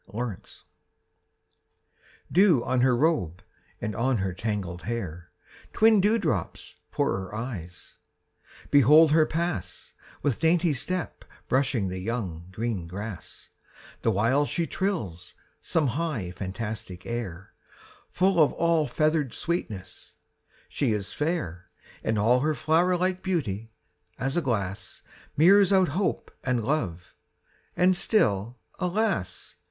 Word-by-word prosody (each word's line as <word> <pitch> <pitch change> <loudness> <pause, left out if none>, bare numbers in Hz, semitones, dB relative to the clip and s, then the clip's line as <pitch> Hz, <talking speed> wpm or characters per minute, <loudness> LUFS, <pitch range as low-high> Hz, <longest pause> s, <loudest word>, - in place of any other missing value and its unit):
MY 110 - -5
LADY 120 -2 -1
APRIL - - -16 1.8
Dew 175 - +5
on 130 -1 +1
her 125 -1 +4
robe 125 - 0 0.4
and 105 - -3
on 130 +2 +1
her 95 -2 -2
tangled 95 -4 -3
hair; 90 -8 -5 0.4
Twin 220 -2 +5
dewdrops 200 - -1
for - - 0
her 95 +1 -6
eyes; 100 -7 -7 0.7
behold 145 +3 +7
her 155 0 +5
pass, 170 +1 -3 0.3
With 140 -6 0
dainty 165 0 +3
step 180 +7 -3 0.2
brushing 130 -7 +1
the 95 0 -4
young, 90 -6 -4
green 110 -4 -3
grass, 100 +1 -8 0.5
The - - +2
while 115 +8 +2
she 170 - -1
trills 105 - -3 0.3
some 160 - +1
high, 140 - -2
fantastic 95 -1 -6
air, 100 -6 -5 0.6
Full 185 -1 +2
of 150 - +4
all 165 -2 +2
feathered 155 0 0
sweetness: 105 - -4 0.5
she 125 -6 0
is 100 -2 -3
fair, 150 - -2 0.4
And 110 - 0
all 115 +5 +4
her 155 +3 0
flower 175 +5 +2
like 185 +1 0
beauty, 115 - -2 0.5
as 135 +2 -2
a 175 - +2
glass, 100 - -3 0.3
Mirrors 195 +5 +6
out 190 -2 +4
hope 185 +7 -1
and 125 -4 0
love: 90 - -2 0.6
and 185 +1 +4
still, 115 - +1 0.2
alas! 180 - -1
125 Hz, 125 wpm, -27 LUFS, 100-165 Hz, 1.8 s, behold